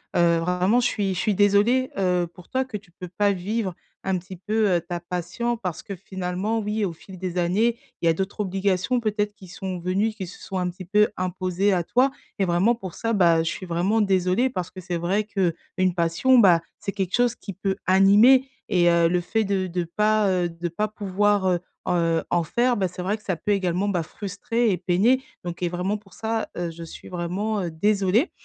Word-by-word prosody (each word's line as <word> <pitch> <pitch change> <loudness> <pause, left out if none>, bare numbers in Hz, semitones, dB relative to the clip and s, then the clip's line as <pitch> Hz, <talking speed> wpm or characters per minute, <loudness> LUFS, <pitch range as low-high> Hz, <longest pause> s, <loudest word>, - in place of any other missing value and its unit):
«Heu, 170 -1 +4
vraiment 180 +7 +2
je 245 - +2
suis 195 -4 -1
je 180 - -3
suis 210 -3 +1
désolée, 205 +6 +3
heu, 180 -2 +2
pour 180 -1 -15
toi 260 0 +1
que 220 -5 -5
tu 200 -3 -18
peux 180 -1 -7
pas 205 -1 +3
vivre 195 0 -2 0.3
un 190 -1 +1
petit 185 +1 -9
peu, 215 +2 +1
heu, - - -3
ta 175 0 -5
passion 180 +7 -3
parce 180 -7 -5
que 200 - -6
finalement, 190 +4 -3
oui, 210 0 -1
au 170 - -3
fil 185 +3 -13
des 185 -1 -4
années, 210 +7 +2 0.2
il - - -1
y - - +6
a - - +4
d'autres 190 +5 -4
obligations 195 +3 0
peut-être 210 -1 -1
qui 190 - -14
sont 190 -1 -5
venues, 195 +5 0
qui 195 -4 -6
se 180 - -12
sont 190 - -5
un 180 -1 0
petit 180 +1 -9
peu 210 +3 +3
imposées 185 +2 0
à 175 - +1
toi» 255 +9 +2 0.3
et 195 - +3
vraiment 180 +7 +3
pour 190 -7 -8
ça, 230 - -2
bah, 170 -4 +4
je 160 - -1
suis 185 - -6
vraiment 180 +6 +1
désolée. 190 +5 +2
Parce 180 -7 -4
que 185 - -10
c'est 175 -1 -3
vrai 190 +5 0
qu'une 185 -2 -1
passion, 175 +10 +3
bah, 180 -6 +6 0.2
c'est 200 -1 -4
quelque 190 -2 -1
chose 245 0 +2
qui 200 - -8
peut 195 0 -2
animer 210 +8 +6 0.2
et 175 -2 +4
heu, 170 -1 +4
le 180 0 +2
fait 220 +5 0
de 195 -2 0
de 175 0 -2
pas 210 +5 +2
heu, 180 -2 +1
de 170 +1 -5
pas 210 +6 -1
pouvoir, 205 -1 +1
heu 175 -1 +2 0.3
heu, 165 -2 +1
en 175 -1 +2
faire, 240 +9 +1
bah, 190 -2 +1
c'est 180 +1 -8
vrai 200 +4 -1
que 215 - -24
ça 190 -3 -1
peut 205 +6 -2
également, 190 0 +1
bah, 175 -4 0
frustrer 215 +6 -2
et 185 - +1
peiner 200 +10 +2 0.2
donc 175 +1 -5
et 175 - +1
vraiment 180 +4 -1
pour 200 -2 -20
ça, 225 0 -2
heu, 175 -1 -2
je 165 +1 -9
suis 165 - -11
vraiment, 190 +5 -2
heu, 170 - -3
désolée. 200 - +2
190 Hz, 225 wpm, -24 LUFS, 175-210 Hz, 0.3 s, y